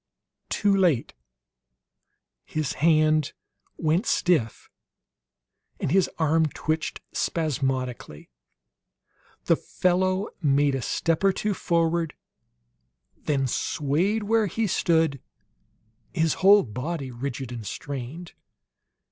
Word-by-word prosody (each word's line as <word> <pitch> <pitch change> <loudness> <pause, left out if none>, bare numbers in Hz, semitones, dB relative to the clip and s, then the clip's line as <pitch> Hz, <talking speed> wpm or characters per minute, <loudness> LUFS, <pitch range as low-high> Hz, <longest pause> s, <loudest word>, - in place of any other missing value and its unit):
Too 205 -1 +2
late; 175 -11 +2 1.3
his 155 -4 -3
hand 155 -1 +3 0.4
went 165 +7 +1
stiff, 155 -11 +1 1.1
and - - -2
his 190 +1 +3
arm 160 0 +2
twitched 155 +2 -3
spasmodically. 130 - -2 1.1
The - - +4
fellow 185 +2 0
made 145 -2 +3
a 135 - -2
step 165 +7 -1
or 195 - +5
two 210 +2 -1
forward, 165 -3 0 1.0
then 140 -3 -1
swayed 160 - 0
where 220 0 +2
he 225 +5 -1
stood, 160 -7 +1 0.9
his 160 0 +2
whole 200 +2 +7
body 135 +4 -5
rigid 125 0 -5
and 120 -2 -6
strained. 140 - -6
160 Hz, 95 wpm, -25 LUFS, 135-180 Hz, 1.3 s, whole